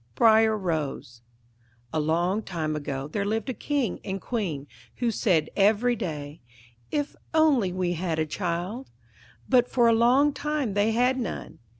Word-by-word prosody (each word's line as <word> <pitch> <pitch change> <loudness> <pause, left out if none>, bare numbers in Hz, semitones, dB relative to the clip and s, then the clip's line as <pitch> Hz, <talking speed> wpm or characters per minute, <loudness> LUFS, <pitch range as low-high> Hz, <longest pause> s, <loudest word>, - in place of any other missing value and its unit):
Briar 220 - +5
Rose 150 - -3 0.7
A 160 - +1
long 170 +7 +1
time 160 -6 -3
ago 140 -2 -4
there 200 +7 -2
lived 220 +4 -1
a - - -4
King 270 -2 -2
and 195 -1 -4
Queen, 180 - -3 0.3
who 235 -1 0
said 170 -9 +1
every 215 +4 +3
day, 150 -8 -5 0.5
'If 290 -1 -2 0.2
only 280 - +4
we 180 -1 -1
had 170 -1 -2
a 160 - +1
child'; 180 - -3 0.6
but 250 -1 +4
for 240 -2 +3
a 230 - +5
long 255 +6 +4
time 295 -8 -2
they 205 +2 +2
had 250 +3 +2
none. 235 - -5
205 Hz, 155 wpm, -26 LUFS, 165-240 Hz, 0.7 s, Briar